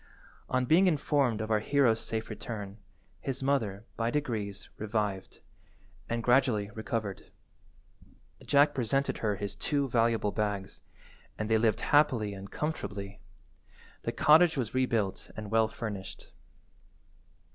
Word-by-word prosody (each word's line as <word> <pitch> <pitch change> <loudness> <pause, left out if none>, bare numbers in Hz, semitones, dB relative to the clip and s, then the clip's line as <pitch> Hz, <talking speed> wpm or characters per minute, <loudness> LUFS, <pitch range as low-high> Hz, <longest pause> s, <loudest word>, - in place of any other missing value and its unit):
On 130 0 +1
being 175 +8 +5
informed 140 -8 +1
of 110 0 -4
our 110 - +4
hero's 120 -1 +3
safe 110 0 -4
return, 105 -3 -6 0.4
his 135 -1 -4
mother, 110 -7 0
by 115 0 0
degrees, 110 -8 -3
revived, 105 -3 -3 0.7
and 115 0 -1
gradually 120 -5 +3
recovered. 110 -2 -4 1.1
Jack 145 +1 +4
presented 135 +2 0
her 105 -2 0
his 100 0 -5
two 140 +6 0
valuable 115 -3 +2
bags, 105 -3 -3 0.6
and 110 +1 -3
they 110 - +4
lived 110 -2 +2
happy 125 -9 +3
and 100 0 -9
comfortably. 100 -10 -4 0.8
The 115 - -2
cottage 155 +5 +5
was 120 -5 -2
rebuilt 115 -7 0
and 105 -1 -6
well 110 0 +4
furnished. 105 -3 -7
115 Hz, 125 wpm, -30 LUFS, 105-135 Hz, 1.1 s, being